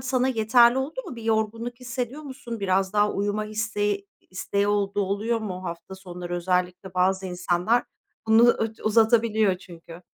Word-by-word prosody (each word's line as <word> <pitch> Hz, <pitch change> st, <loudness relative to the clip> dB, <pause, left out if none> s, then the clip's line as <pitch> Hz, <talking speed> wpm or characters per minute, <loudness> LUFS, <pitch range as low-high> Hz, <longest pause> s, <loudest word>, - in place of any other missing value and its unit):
sana 255 Hz, 0 st, 0 dB
yeterli 235 Hz, +1 st, +4 dB
oldu 305 Hz, -, -3 dB
mu? 245 Hz, -, -7 dB
Bir 230 Hz, -, -8 dB
yorgunluk 225 Hz, +2 st, -1 dB
hissediyor 250 Hz, +3 st, -4 dB
musun? 240 Hz, -5 st, -7 dB
Biraz 190 Hz, 0 st, +1 dB
daha 210 Hz, 0 st, +2 dB
uyuma 205 Hz, +1 st, -1 dB
isteği 210 Hz, -2 st, -2 dB, 0.2 s
isteği 200 Hz, +2 st, -1 dB
olduğu 205 Hz, 0 st, 0 dB
oluyor 210 Hz, +4 st, -1 dB
mu, 185 Hz, -3 st, -5 dB
hafta 170 Hz, +2 st, -7 dB
sonları? 180 Hz, -2 st, -7 dB
Özellikle 180 Hz, +1 st, -2 dB
bazı 190 Hz, +1 st, +1 dB
insanlar 180 Hz, +6 st, 0 dB, 0.4 s
bunu 220 Hz, +1 st, +6 dB, 0.4 s
u-uzatabiliyor 220 Hz, -2 st, +3 dB
çünkü. 170 Hz, -1 st, -13 dB
210 Hz, 140 wpm, -25 LUFS, 185-230 Hz, 0.4 s, bunu